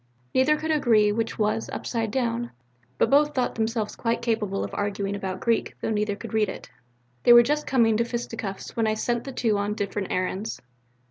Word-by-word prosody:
Neither 285 Hz, +4 st, +4 dB
could 315 Hz, +1 st, -2 dB
agree 225 Hz, -8 st, +4 dB
which 225 Hz, +1 st, -2 dB
was 215 Hz, +1 st, 0 dB
upside 230 Hz, -2 st, -2 dB
down, 240 Hz, 0 st, -1 dB, 0.5 s
but -, -, +2 dB
both 295 Hz, +1 st, +4 dB
thought 255 Hz, -2 st, 0 dB
themselves 220 Hz, -1 st, -2 dB
quite 230 Hz, 0 st, -1 dB
capable 215 Hz, -4 st, -1 dB
of -, -, -6 dB
arguing 200 Hz, -1 st, -2 dB
about 190 Hz, -2 st, -4 dB
Greek, 230 Hz, -1 st, 0 dB
though -, -, -2 dB
neither 210 Hz, -1 st, 0 dB
could 230 Hz, +2 st, -9 dB
read 215 Hz, -2 st, +2 dB
it. -, -, -8 dB, 0.5 s
They 240 Hz, -, +7 dB
were 240 Hz, 0 st, +9 dB
just 295 Hz, +4 st, -1 dB
coming 230 Hz, -4 st, +3 dB
to 235 Hz, -, +2 dB
fisticuffs 230 Hz, -4 st, -5 dB
when 225 Hz, -1 st, +1 dB
I 215 Hz, -, +1 dB
sent 235 Hz, +2 st, -1 dB
the 270 Hz, -, -5 dB
two 225 Hz, -5 st, 0 dB
on 205 Hz, +1 st, -1 dB
different 200 Hz, -1 st, -3 dB
errands." 190 Hz, +4 st, -2 dB
225 Hz, 195 wpm, -25 LUFS, 210-240 Hz, 0.5 s, were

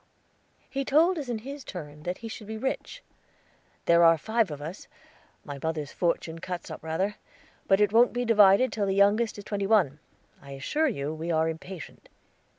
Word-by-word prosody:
He 275 Hz, +1 st, -3 dB
told 320 Hz, +6 st, +3 dB
us 275 Hz, -4 st, -6 dB
in 235 Hz, -, -1 dB
his 280 Hz, 0 st, -7 dB
turn 150 Hz, -5 st, -8 dB
that 180 Hz, +3 st, -4 dB
he -, -, -3 dB
should 220 Hz, -1 st, -8 dB
be 220 Hz, 0 st, -5 dB
rich. 265 Hz, -, -4 dB, 0.8 s
"There 170 Hz, 0 st, +5 dB
are 165 Hz, 0 st, +7 dB
five 220 Hz, +4 st, 0 dB
of 150 Hz, -2 st, -6 dB
us. 160 Hz, +6 st, -8 dB, 0.6 s
My 140 Hz, -1 st, -7 dB
mother's 155 Hz, -3 st, -3 dB
fortune 165 Hz, -1 st, -1 dB
cuts 180 Hz, 0 st, -6 dB
up -, -, -7 dB
rather; 185 Hz, +6 st, -2 dB, 0.5 s
but 195 Hz, -, +4 dB
it 210 Hz, -1 st, +3 dB
wont 235 Hz, +2 st, +6 dB
be 245 Hz, 0 st, -2 dB
divided 210 Hz, +2 st, +5 dB
till 205 Hz, -2 st, -1 dB
the 195 Hz, -, 0 dB
youngest 205 Hz, +3 st, +3 dB
is 205 Hz, -, -8 dB
twenty 200 Hz, -1 st, -2 dB
one. 180 Hz, -10 st, +3 dB, 0.4 s
I 140 Hz, 0 st, -10 dB
assure 295 Hz, -, 0 dB
you 150 Hz, -, -2 dB
we 160 Hz, +2 st, -5 dB
are 160 Hz, 0 st, +2 dB
impatient." 165 Hz, +1 st, -8 dB
195 Hz, 185 wpm, -27 LUFS, 160-225 Hz, 0.8 s, are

